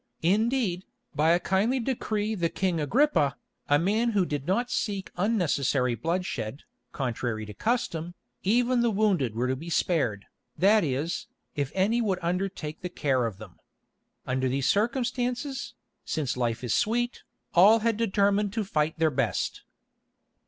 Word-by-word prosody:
Indeed, 205 0 +1 0.3
by 155 +2 +2
a 170 +1 +5
kindly 205 +9 +1
decree 220 -4 -1
the 170 -5 0
King 180 -1 -1
Agrippa, 155 - +2 0.3
a 145 - +5
man 215 +8 +1
who 195 -3 +3
did 145 -3 -4
not 240 +7 0
seek 200 -3 -2
unnecessary 150 - +1
bloodshed, 140 - -3 0.3
contrary 120 -4 -3
to 105 - -9
custom, 175 - -2 0.3
even 240 +4 +2
the 235 - +3
wounded 195 - +1
were 120 +2 0
to 130 - 0
be 160 +6 -8
spared, 135 - 0 0.3
that 205 +2 +5
is, 145 +3 -2 0.3
if 145 -1 -2
any 210 +5 +2
would 200 -5 0
undertake 175 -3 -3
the 180 - -4
care 130 -8 0
of 105 -5 -7
them. 105 -3 -13 0.7
Under 130 0 0
these 135 +1 0
circumstances, 245 - -1 0.3
since 145 -5 -2
life 120 -1 -1
is 120 - 0
sweet, 240 +2 0 0.3
all 210 +6 +7
had 230 0 +1
determined 205 -2 +1
to 220 -1 -1
fight 155 -5 -1
their 160 -1 +2
best. 130 -4 -1
180 Hz, 145 wpm, -27 LUFS, 140-220 Hz, 0.7 s, all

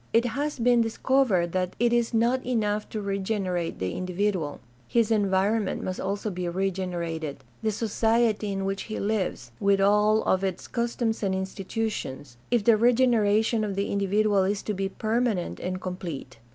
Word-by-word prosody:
It 230 +1 +4
has 285 +6 -2
been 240 0 +4
dis 225 -1 -2
covered 225 -11 +2
that 185 0 -1
it 240 0 +3
is 235 -1 +2
not 235 +3 +2
enough 215 -4 -1
to 215 - -4
regenerate 195 -3 -2
the 95 -1 -2
individual; 185 -4 -1 0.3
his 230 -2 +2
environment 205 0 +1
must 185 - -3
also 200 +2 -2
be 180 -1 -3
regenerated 170 -6 -3
— 120 - -31
^the 220 - +2
society 220 0 +1
in 195 0 -2
which 195 0 -2
he 215 - -3
lives, 195 - -2
with 200 0 +3
all 210 +2 +4
of 190 +1 +1
its 190 -2 -3
customs 235 -1 -1
and 195 -2 0
institutions 190 - -4
— - - -32
if 235 -3 +2
the 225 0 +5
regeneration 230 -2 +3
of 200 -2 -2
the 200 +1 -1
individual 200 0 +2
is 200 +1 -1
to 210 - -2
be 195 0 -2
permanent 220 -3 -1
and 185 +1 -3
com 185 -1 -5
plete. 140 -8 -7
205 Hz, 175 wpm, -26 LUFS, 185-225 Hz, 0.3 s, the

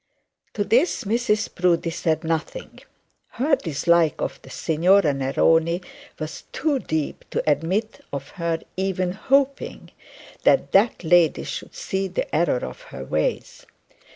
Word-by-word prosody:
To 205 - +1
this 255 - +2
Mrs 215 0 0
Proudie 175 -2 +1
said 160 -2 -1
nothing. 165 - -4 0.5
Her 280 +4 +2
dislike 170 - +1
of - - -4
the - - -14
Signora 165 0 +3
Neroni 160 +6 +2 0.3
was 155 0 -6
too 290 -1 0
deep 155 - -3
to - - -2
admit 185 +9 0
of 140 -1 -5
her 170 -2 -2
even 185 -1 -1
hoping 275 +7 0 0.5
that - - +3
that 200 0 +3
lady 170 -1 +4
should - - -6
see 195 - -2
the 185 -3 -3
error 155 -6 +1
of - - -9
her 65 - -9
ways. 75 +3 -2
175 Hz, 130 wpm, -23 LUFS, 160-210 Hz, 0.5 s, lady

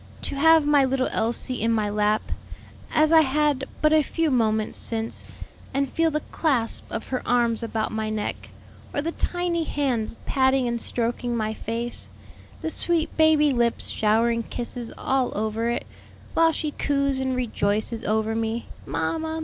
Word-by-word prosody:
to - - -1
have 320 +2 +5
my 290 -1 +5
little 260 0 +1
Elsie 235 +2 -1
in 230 +1 +2
my 215 -2 +1
lap, 210 +1 0 0.6
as 310 +1 +4
I 320 - +8
had 285 -1 +1 0.2
but 305 0 +5
a 310 - +6
few 320 +2 0
moments 220 -3 +1
since, 225 0 -1 0.5
and 275 0 +2
feel 330 +4 +1
the 305 -1 -2
clasp 255 -8 0
of - - -5
her 255 - -1
arms 240 -2 +2
about 225 -1 -2
my 220 0 -2
neck, 215 -1 -4 0.5
or 285 - 0
the 330 - -1
tiny 350 -1 -1
hands 255 -8 -1
patting 265 -1 +2
and 235 -1 -2
stroking 240 0 -2
my 215 -1 -1
face, 230 +2 -3 0.5
the 320 - -2
sweet 335 0 0
baby 310 -2 +4
lips 235 -1 0
showering 230 +2 +2
kisses 240 +1 -5
all 265 -4 0
over 220 +2 -1
it, 240 - -2 0.5
while 330 0 +4
she 305 -1 -2
coos 280 -2 0
and 260 -1 -1
rejoices 220 -2 -1
over 220 +1 0
me; 225 +1 -2 0.2
Mamma! 320 0 -2
250 Hz, 160 wpm, -24 LUFS, 225-295 Hz, 0.6 s, I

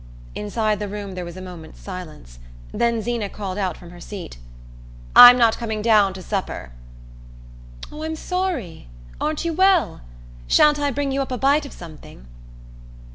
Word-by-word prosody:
Inside 210 0 -2
the 210 - -4
room 200 -1 -6
there 180 -1 -5
was 175 +1 -9
a 185 - -8
moment's 170 -4 -11
silence; 155 - -10 0.3
then 235 -2 0
Zeena 235 -3 -2
called 195 -1 -6
out 185 -4 -2
from 175 -1 -13
her 175 - -13
seat: 180 - -9 0.8
"I'm 245 0 +11
not 230 -2 +3
coming 220 -3 -4
down 210 -4 +3
to 185 - -9
supper." 190 - -4 1.2
"Oh, 300 - -9
I'm 320 0 -3
sorry! 330 - -4 0.3
Aren't 310 +2 -2
you 335 - -1
well? 375 - +2 0.5
Sha'n't 295 - +4
I 290 0 0
bring 280 0 -2
you 275 +1 -1
up 265 - -5
a 250 - -2
bite 280 +3 +2
of - - -13
something?" 155 - -13
215 Hz, 165 wpm, -22 LUFS, 185-275 Hz, 1.2 s, I'm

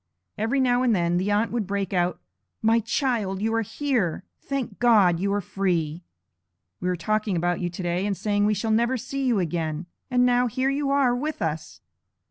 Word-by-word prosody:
Every 225 +6 0
now 250 -1 +3
and 245 -4 +3
then, 175 -1 +1
the 190 +3 0
aunt 210 +2 +1
would 225 -5 -2
break 200 -1 -2
out: 180 -1 0 0.4
'My 225 +1 +4
child, 225 -4 -1
you 220 +2 0
are 225 - +2
here! 225 - -1 0.2
Thank 265 -7 -4
God, 205 -8 +5
you 200 +2 0
are 205 0 0
free! 175 -4 -1 0.8
We 180 - -1
were 180 - +1
talking 215 +3 -1
about 175 +1 0
you 175 - -1
today, 175 +2 -2
and 200 -2 -1
saying, 205 -1 +1
we 210 - +2
shall 220 +3 -1
never 235 +4 +2
see 275 +4 -4
you 245 -4 +2
again; 165 -2 -2 0.2
and 250 -1 +3
now 245 0 +3
here 260 +3 0
you 280 0 -1
are 275 -3 +3
with 300 +5 -3
us.' 150 - -4
210 Hz, 195 wpm, -25 LUFS, 180-245 Hz, 0.8 s, God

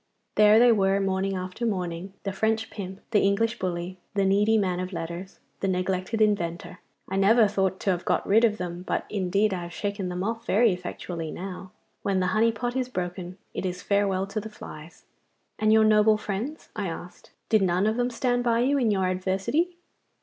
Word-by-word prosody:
There 210 0 +6
they 240 +1 +7
were 195 -2 +3
morning 195 0 0
after 185 +5 -5
morning, 185 -3 -2
the 195 - -2
French 220 +3 0
pimp, 190 -2 -7
the 210 - +4
English 220 +4 +1
bully, 180 0 -3 0.2
the 200 -1 +2
needy 205 +3 +3
man 185 -4 0
o' 185 - -2
letters, 170 +2 -6 0.2
the 195 - -1
neglected 185 +3 -1
inventor 190 -3 -1 0.3
I 190 - -2
never 215 +3 +5
thought 190 -2 0
to 195 - +2
have 180 -1 -2
got - - 0
rid 220 +4 +5
of 215 -2 +3
them, 175 -1 -5
but 185 - -2
indeed 200 +1 +1
I 180 - -3
have 175 0 -7
shaken 200 -2 -3
them 180 +1 -3
off 225 +2 -3
very 225 +2 +4
effectually 175 -2 -5
now. 185 +1 -7 0.3
When 195 -2 0
the 185 - +1
honey 225 +2 +4
pot 240 +2 -3
is 255 -1 -1
broken 180 -3 -5 0.2
it - - -4
is 180 -1 -4
farewell 200 -2 +1
to 200 +2 -4
the 215 +1 -7
flies.' 160 -6 -11 0.5
'And 215 0 +3
your 220 0 +6
noble 215 0 +5
friends?' 215 +10 -5
I 205 -3 -2
asked. 175 +1 -8 0.2
'Did 220 -2 +4
none 185 +1 +2
of 215 +1 +2
them 245 +1 +1
stand 245 0 0
by 235 -1 +2
you 280 +3 +2
in 235 -4 +2
your 190 -3 +1
adversity? 195 - -1
195 Hz, 200 wpm, -26 LUFS, 185-220 Hz, 0.5 s, they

